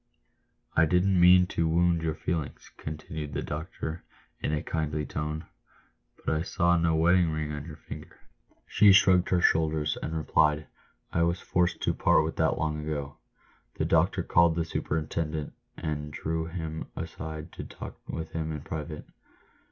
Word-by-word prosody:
" - - -45 0.3
I 80 - +6
didn't 90 +3 +3
mean 90 +1 +8
to 85 - 0
wound 85 +1 +3
your 80 -1 -1
feelings," 80 -3 -4
continued 75 -1 -6
the 75 - -2
doctor, 80 +1 -5 0.4
in - - -1
a 75 -1 -1
kindly 75 -1 -2
tone, 75 +1 -4 0.4
" - - -41
but - - +1
I 80 - 0
saw 85 0 +2
no 85 -1 +2
wedding 85 +1 +4
ring 75 -1 -2
on 75 -1 -5
your 80 -3 -8
finger." - - -10 0.5
She 100 -2 +6
shrugged 95 -2 +5
her 90 -1 +3
shoulders, 80 -3 +2
and 80 +1 -3
replied, 75 -1 +2 0.3
" - - -37
I 85 - +2
was 85 +2 +2
forced 90 0 0
to - - +2
part - - +4
with - - -4
that - - +2
long 75 -1 -1
ago." 70 -2 -4 0.6
The - - -1
doctor - - +2
called 85 -1 +4
the 85 -1 0
superintendent, 80 -1 -2 0.2
and 75 -2 -3
drew 80 +2 -2
him 80 -2 -5
aside 80 0 -6
to - - -7
talk - - -9
with 80 -1 -4
him 80 -1 -3
in 75 -2 -4
private. 75 +1 -6
80 Hz, 170 wpm, -28 LUFS, 75-85 Hz, 0.6 s, mean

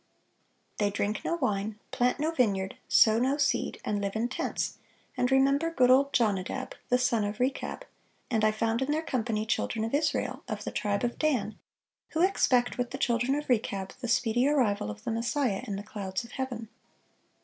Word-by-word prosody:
They 205 -1 +2
drink 205 +1 -2
no 340 - 0
wine, 210 -7 -1
plant 250 +2 +1
no 310 +2 +1
vineyard, 200 -10 0
sow 220 0 +5
no 265 +4 +1
seed, 285 -1 0
and 205 -1 -1
live 200 0 -2
in 230 +2 0
tents, 260 - -3 0.4
and 250 +1 +1
remember 275 +4 +3
good 255 -6 +4
old 275 +2 +5
Jonadab, 220 +1 0 0.2
the 250 - +4
son 235 -3 +1
of 205 +1 -3
Rechab; 270 - -2 0.5
and 220 -2 +1
I 215 - +6
found 225 +2 0
in 265 - -1
their 310 +2 +1
company 225 -6 -1
children 220 0 -1
of 225 - -5
Israel, 295 0 0
of - - -4
the - - -4
tribe 205 +1 -1
of 240 0 -2
Dan,... 245 -9 0 0.6
who 325 +2 +2
expect, 255 -11 +2
with 245 -1 0
the 270 - -5
children 245 0 +1
of 295 0 -4
Rechab, 210 -5 0
the 245 - -3
speedy 240 +2 +2
arrival 230 - +1
of 105 0 -8
the - - -2
Messiah 235 -1 0
in 200 - -3
the 200 - -5
clouds 195 -2 -4
of 235 - -12
heaven." 245 -4 -4
240 Hz, 190 wpm, -29 LUFS, 210-265 Hz, 0.6 s, I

